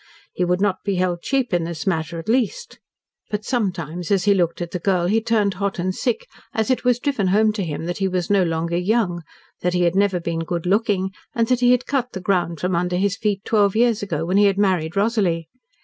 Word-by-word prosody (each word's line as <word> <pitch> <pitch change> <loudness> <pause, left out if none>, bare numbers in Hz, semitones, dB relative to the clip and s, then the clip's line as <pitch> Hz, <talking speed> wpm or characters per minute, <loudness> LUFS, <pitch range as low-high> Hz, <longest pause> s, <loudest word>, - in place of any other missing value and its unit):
He - - -1
would 180 +1 +1
not 195 -2 0
be 200 -2 -1
held 180 -1 0
cheap 265 -3 -1
in 175 -1 +2
this 165 -3 -5
matter, 165 -2 -1
at 165 - -7
least. 260 - -1 0.5
But 210 0 -3
sometimes, 180 - -2
as 195 -3 +2
he 205 0 +4
looked 175 -3 0
at 175 -1 -4
the 180 - -3
girl 180 -1 +1
he 215 +5 +2
turned 215 -3 +1
hot 200 +1 -2
and 185 +1 -1
sick, 240 +3 -2 0.3
as 220 +3 +1
it 255 - 0
was 250 -1 +3
driven 245 -7 -1
home 215 +3 +3
to 205 -2 -2
him 160 -1 -4
that 175 +1 -3
he 195 - +1
was 180 -2 -1
no 200 -1 +3
longer 170 0 -1
young, 180 -2 0 0.4
that 180 0 0
he 180 - +2
had 170 +1 +2
never 195 -2 +2
been 165 -1 -3
good 170 +1 -3
looking, 195 -1 +1 0.2
and 230 -1 +2
that 250 -1 +3
he 245 0 +4
had 250 0 +3
cut 255 -3 -1
the 190 - -4
ground 180 -3 0
from 180 0 0
under 180 +1 0
his 200 +2 +1
feet 205 -2 -2
twelve 205 -3 +2
years 230 -1 +3
ago, 200 -5 -2
when 185 +3 +1
he 205 - +6
had 195 -1 +2
married 185 -5 +1
Rosalie! 195 -6 +1
190 Hz, 240 wpm, -21 LUFS, 175-215 Hz, 0.5 s, he